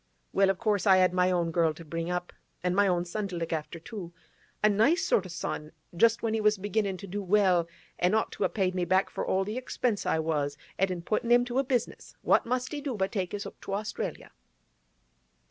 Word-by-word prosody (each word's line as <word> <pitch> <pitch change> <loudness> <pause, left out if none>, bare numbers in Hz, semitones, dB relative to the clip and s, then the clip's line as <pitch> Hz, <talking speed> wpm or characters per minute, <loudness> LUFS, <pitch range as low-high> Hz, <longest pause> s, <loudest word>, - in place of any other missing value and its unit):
Well, 195 0 +4
of 195 - +1
course 210 -1 0
I 190 -1 +7
had 185 -1 +4
my 180 0 +3
own 175 -2 +1
girl 165 -2 +2
to 165 - -11
bring 165 +2 -4
up, 180 0 -3 0.3
an' 180 0 +1
my 200 +1 +4
own 175 -2 +1
son 200 +4 -3
to 185 - -6
look 165 -1 -3
after 160 +1 -4
too. 190 -2 -8 0.5
A - - +7
nice 220 - +3
sort 190 - +2
o' - - -12
son; 155 -2 -5 0.2
just 225 +4 +3
when 225 -1 0
he 220 - 0
was 210 0 +3
beginnin' 200 0 -1
to 200 - -9
do 200 +2 -4
well, 185 -3 +3 0.3
an' 180 +4 +3
ought 220 - +1
to - - -3
a - - +2
paid 185 -3 0
me 180 -1 -1
back 185 +3 +2
for - - -3
all 190 +1 +1
the 210 +4 -4
expense 250 -4 -1
I - - +2
was 150 -3 -1 0.2
at 195 0 +3
in 175 -2 -4
puttin' 215 +5 -1
him 245 0 +6
to 245 +2 -1
a - - +3
business, 250 -3 -2
what - - +3
must 255 +1 -1
he 295 -1 -4
do 275 -4 -3
but 190 0 0
take 190 -5 -2
his 205 0 -4
'ook - - -10
to 195 - -3
Australia. 210 +1 -4
195 Hz, 240 wpm, -29 LUFS, 175-215 Hz, 0.5 s, I